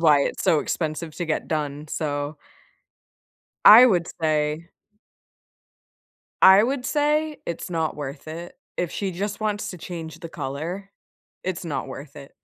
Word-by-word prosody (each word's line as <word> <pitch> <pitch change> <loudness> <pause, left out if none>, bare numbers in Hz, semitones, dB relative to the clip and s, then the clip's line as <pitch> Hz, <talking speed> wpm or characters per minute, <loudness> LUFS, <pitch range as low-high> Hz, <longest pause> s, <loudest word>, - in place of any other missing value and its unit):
why 150 -4 +5
it's - - -2
so 155 - +4
expensive 155 0 -3
to 175 - -2
get 155 - -2
done, 150 -1 -3
so 145 -1 -3 1.3
I 225 +4 +11
would 180 -8 +3
say 155 +1 0 1.7
I 190 +2 +9
would 250 +2 -1
say 300 +1 +1
it's 170 +1 -5
not 165 -2 -1
worth 145 0 -7
it. 170 +2 -8 0.2
If 175 -2 -1
she 195 -2 -2
just 200 +4 -4
wants 210 -1 -2
to 180 - -9
change 165 -2 -7
the 165 - -7
color, 170 +10 -5 0.5
it's 185 -1 -3
not 145 -5 -3
worth 140 +2 -9
it. 140 -1 -11
165 Hz, 145 wpm, -24 LUFS, 150-195 Hz, 1.7 s, I